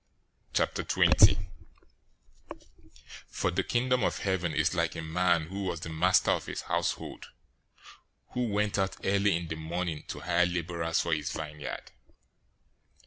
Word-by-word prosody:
020:001 95 - +4 1.8
"For 90 - -1
the 95 +3 +1
Kingdom 125 +3 +1
of - - +1
Heaven 95 -4 -1
is 75 +2 +1
like 85 -2 0
a - - -4
man 85 0 +1
who 100 +1 -4
was 85 -3 -3
the 80 - -5
master 90 +4 +3
of - - -1
a - - -5
household, - - -2 1.0
who 125 -1 -1
went 105 -1 0
out 95 0 -1
early 100 -1 +2
in 85 0 -6
the 80 - -4
morning 80 0 -3
to - - -6
hire 90 0 +2
laborers 85 -1 -1
for 85 - -1
his 75 0 -1
vineyard. 75 -2 -6
90 Hz, 140 wpm, -29 LUFS, 80-95 Hz, 1.8 s, 020:001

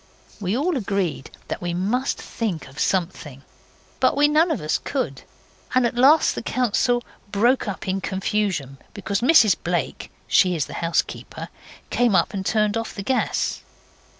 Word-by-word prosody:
We 200 +2 -1
all 315 +3 0
agreed 195 - -2 0.2
that - - -4
we 175 -1 -2
must 230 +9 -1
think 195 -11 -4
of 140 +2 -12
something, 165 -7 -2 0.6
but - - +2
we 295 +1 +5
none 310 +3 +3
of 315 - 0
us 155 0 -1
could, 160 - -3 0.5
and 255 -1 +4
at 235 - 0
last 275 +6 +5
the - - -4
council 245 0 +1 0.3
broke 235 +5 +2
up 195 -1 -5
in 190 +1 -1
confusion 190 -9 -2 0.2
because 200 0 -2
Mrs 235 - +6
Blake 175 -3 -2 0.2
she 180 -1 +4
is 150 -4 0
the - - -10
housekeeper 165 0 -2 0.4
came 240 -5 +3
up 170 +2 +2
and 195 -1 -3
turned 210 +3 +1
off 230 - -4
the 200 - -5
gas. 255 +5 0
200 Hz, 160 wpm, -23 LUFS, 175-245 Hz, 0.6 s, Mrs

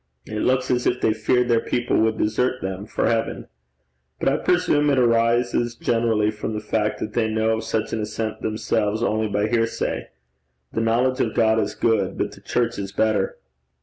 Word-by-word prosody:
It 110 0 -5
looks 130 +2 +1
as 125 -1 +1
if 125 - +1
they 110 - +2
feared 120 +3 +1
their 115 -1 +3
people 120 +1 -1
would 110 0 +2
desert 125 +4 0
them 95 +2 -5
for - - -1
heaven. 115 -1 -1 0.7
But - - +2
I - - +1
presume 165 -5 +2
it 140 - +2
arises 120 0 +2
generally 115 -3 +1
from 110 +1 -5
the - - -2
fact 105 0 -1
that - - -4
they 115 -2 +1
know 110 +1 +1
of 110 - -5
such 110 -1 -2
an 110 - -1
ascent 110 +1 -4
themselves, 110 0 -1
only 110 -1 +1
by 105 0 0
hearsay. 115 0 -1 0.7
The 115 - 0
knowledge 120 +3 +1
of 110 - -1
God 110 -1 +3
is - - -2
good, 105 -5 +1
but - - -1
the - - -14
church 120 -3 -1
is 100 -1 -4
better!' 110 - 0
115 Hz, 190 wpm, -23 LUFS, 110-120 Hz, 0.7 s, their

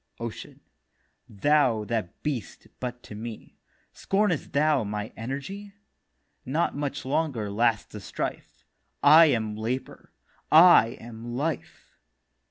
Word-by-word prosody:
OCEAN: 115 -1 -7 0.7
'Thou 120 0 +2
that 105 -4 -4
beëst 140 -7 -4
but 125 -1 -5
to - - -11
be, 110 +1 -9 0.3
Scornest 195 -6 0
thou 150 -3 +2
my 105 +1 -5
energy? 140 - -6 0.7
Not 150 +7 -1
much 145 -2 -4
longer 130 -7 -1
lasts 115 0 +1
the 105 - -7
strife. 100 - -6 0.4
I 155 +3 +8
am 110 -6 0
Labour, 115 +5 -5 0.4
I 155 -8 +7
am 115 +1 -8
Life. 150 +4 -5
125 Hz, 110 wpm, -26 LUFS, 110-150 Hz, 0.7 s, I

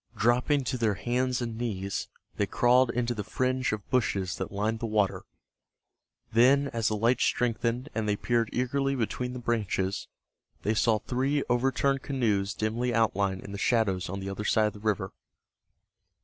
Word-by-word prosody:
Dropping 125 +5 +2
to 125 +1 -2
their 110 -3 +2
hands 125 +3 0
and 115 -1 -5
knees, 100 -5 -3 0.3
they 100 - 0
crawled 125 +3 +4
into 120 0 0
the 105 -3 -4
fringe 130 +4 0
of 110 -2 -4
bushes 100 -7 +1
that - - -4
lined 105 +3 -1
the 115 - -2
water. 105 -3 0 1.1
Then, 135 +5 +5
as 115 -3 -1
the 110 - +1
light 115 +4 +2
strengthened, 120 +2 0
and 110 -1 -1
they 105 - +2
peered 115 +1 0
eagerly 135 +2 0
between 125 +1 -2
the - - -5
branches, 105 -5 -1 0.6
they 105 - +1
saw 110 0 +3
three 135 +6 0
overturned 135 +2 +1
canoes 105 -9 0
dimly 120 +3 -1
outlined 100 -4 +1
in 100 - -9
the 100 - -6
shadows 100 -6 +1
on 95 +2 -4
the 95 0 -5
other 100 +2 -5
side 110 0 +3
of 105 - -1
the 105 - -11
river. 100 -3 -1
115 Hz, 170 wpm, -28 LUFS, 105-125 Hz, 1.1 s, Then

